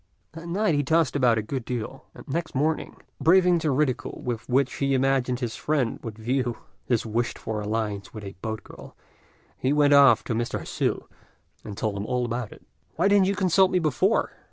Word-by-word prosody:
That 165 Hz, +2 st, -9 dB
night 200 Hz, +1 st, +1 dB
he 145 Hz, -, +2 dB
tossed 160 Hz, 0 st, +1 dB
about 125 Hz, -5 st, +3 dB
a 110 Hz, -, -1 dB
good 130 Hz, +3 st, -4 dB
deal; 125 Hz, +2 st, -5 dB
and -, -, -13 dB
next 160 Hz, +2 st, -3 dB
morning, 155 Hz, +4 st, -1 dB, 0.3 s
braving 180 Hz, 0 st, +5 dB
the 160 Hz, -, -1 dB
ridicule 135 Hz, -2 st, -1 dB
with 120 Hz, -2 st, -4 dB
which 130 Hz, +1 st, +2 dB
he 140 Hz, -1 st, +1 dB
imagined 130 Hz, -1 st, +1 dB
his 115 Hz, -2 st, -3 dB
friend 145 Hz, -6 st, -1 dB
would 110 Hz, -2 st, -7 dB
view 120 Hz, +1 st, -1 dB, 0.3 s
his 120 Hz, -3 st, +1 dB
wished 115 Hz, +2 st, -2 dB
for 110 Hz, -1 st, -4 dB
alliance 105 Hz, -1 st, -3 dB
with 110 Hz, -2 st, -9 dB
a 100 Hz, -1 st, -7 dB
boat 110 Hz, -1 st, -4 dB
girl, -, -, -13 dB, 0.6 s
he 130 Hz, -, +1 dB
went 145 Hz, -1 st, +4 dB
off 140 Hz, -1 st, +6 dB
to 120 Hz, -, -3 dB
Mr. 115 Hz, +1 st, -2 dB
Hsü, -, -, -2 dB, 0.6 s
and 105 Hz, -2 st, -8 dB
told 105 Hz, -2 st, -2 dB
him 100 Hz, +2 st, -4 dB
all 125 Hz, -1 st, 0 dB
about 120 Hz, -1 st, -4 dB
it. -, -, -15 dB, 0.3 s
"Why 175 Hz, +4 st, +2 dB
didn't 200 Hz, -2 st, +4 dB
you 200 Hz, -, 0 dB
consult 190 Hz, -1 st, +3 dB
me 185 Hz, -, +1 dB
before?" 175 Hz, -, +1 dB
130 Hz, 200 wpm, -25 LUFS, 115-155 Hz, 0.6 s, off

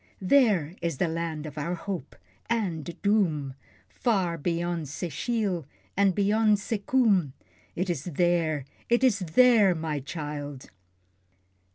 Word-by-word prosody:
There 190 Hz, -, +3 dB
is 170 Hz, -5 st, -2 dB
the 175 Hz, -, +1 dB
land 160 Hz, -2 st, -3 dB
of 150 Hz, 0 st, -7 dB
our 170 Hz, +5 st, -2 dB
Hope 180 Hz, -4 st, -6 dB, 0.3 s
and 175 Hz, -7 st, -2 dB
Doom, 170 Hz, -10 st, +1 dB, 0.3 s
Far 180 Hz, -, 0 dB
beyond 170 Hz, 0 st, -2 dB
Secheel, 180 Hz, -, -2 dB, 0.3 s
and 195 Hz, -2 st, +3 dB
beyond 210 Hz, +1 st, +3 dB
Sekoom. 205 Hz, -, +1 dB, 0.4 s
It 180 Hz, +2 st, -1 dB
is 165 Hz, -5 st, -2 dB
there, 165 Hz, -4 st, +1 dB, 0.2 s
it 240 Hz, +2 st, +3 dB
is 240 Hz, -6 st, +4 dB
THERE, 205 Hz, +2 st, +5 dB
my 155 Hz, -2 st, -2 dB
child! 145 Hz, -2 st, -6 dB
175 Hz, 120 wpm, -27 LUFS, 155-205 Hz, 0.4 s, THERE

